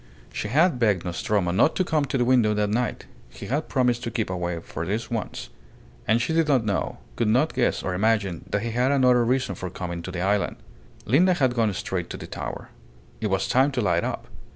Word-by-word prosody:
She - - -3
had 155 - +3
begged 100 -7 +2
Nostromo 90 +1 0
not 95 - +3
to 185 - +2
come 155 -4 +1
to 135 - -2
the 120 - +2
window 120 -4 +3
that 105 -1 0
night. 120 +3 -1 0.2
He - - -10
had 145 +5 -2
promised 125 -3 +1
to 115 - -2
keep 110 -3 -2
away 90 -2 -2
for 80 - -6
this 105 +8 -3
once. 115 -2 -4 0.6
And 110 +2 +4
she 125 +7 -1
did 165 -1 +2
not 130 -6 +2
know, 100 -3 -1 0.2
could 115 - 0
not 130 +9 +2
guess - - 0
or 95 - -2
imagine, 100 -2 0
that 100 - -1
he 115 - -2
had 125 +4 +1
another 125 -3 +4
reason 125 -3 0
for 90 0 -6
coming 85 -1 -5
on 95 - -6
the 90 - -4
island. 100 0 +1 0.5
Linda 175 - +4
had 130 -6 +2
gone 115 -3 +2
straight 90 -1 -3
to - - -6
the - - -8
tower. - - -6 0.5
It 110 - -1
was 95 -1 0
time 135 +3 +3
to 125 - 0
light 85 -5 +1
up. - - -3
110 Hz, 225 wpm, -25 LUFS, 95-130 Hz, 0.6 s, And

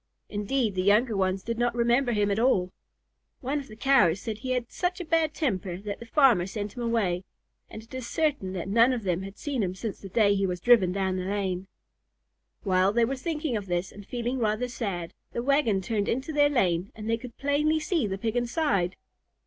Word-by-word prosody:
Indeed 215 +2 0
the 185 - 0
younger 210 +4 +3
ones 190 0 0
did 230 0 -3
not 240 0 +1
remember 240 +2 +2
him 205 -2 +1
at 200 - 0
all. 195 -7 +2 0.7
One 280 +3 -1
of 275 - -9
the 215 - -11
Cows 225 -8 +4
said 220 0 -5
he 255 - -6
had 245 -2 -3
such 360 0 -2
a 355 - -5
bad 320 -1 +1
temper 190 - -1
that 200 +1 -6
the 235 - -10
farmer 235 - +4
sent 205 0 -5
him 245 - -5
away, 210 -7 0 0.5
and 220 - -9
it 225 - -18
is 260 -2 -5
certain 285 - -1
that 185 -1 -4
none 230 +5 +4
of 240 -3 -3
them 180 -2 0
had 195 +1 -8
seen 280 -5 -2
him 185 -2 -1
since 210 +1 -5
the 195 - -9
day 205 +1 +4
he 195 -1 +1
was 180 -1 -3
driven 210 -4 +5
down 190 -1 -1
the 185 - -3
lane. 190 -2 -2 1.0
While 185 0 +3
they 235 0 +4
were 270 +4 -2
thinking 300 -1 -2
of 205 -2 -3
this 175 0 -1
and 205 - -11
feeling 245 +4 -3
rather 220 +2 0
sad, 195 -9 -4 0.2
the 235 - -2
wagon 265 -8 +2
turned 205 +1 -1
into 265 +6 -2
their 290 -1 +4
lane 185 -8 +1
and 215 0 -7
they 230 - +2
could 240 -1 -11
plainly 300 +3 +1
see 310 - 0
the 190 -1 -3
Pig 220 +3 -2
inside. 240 - 0
225 Hz, 220 wpm, -27 LUFS, 195-260 Hz, 1.0 s, driven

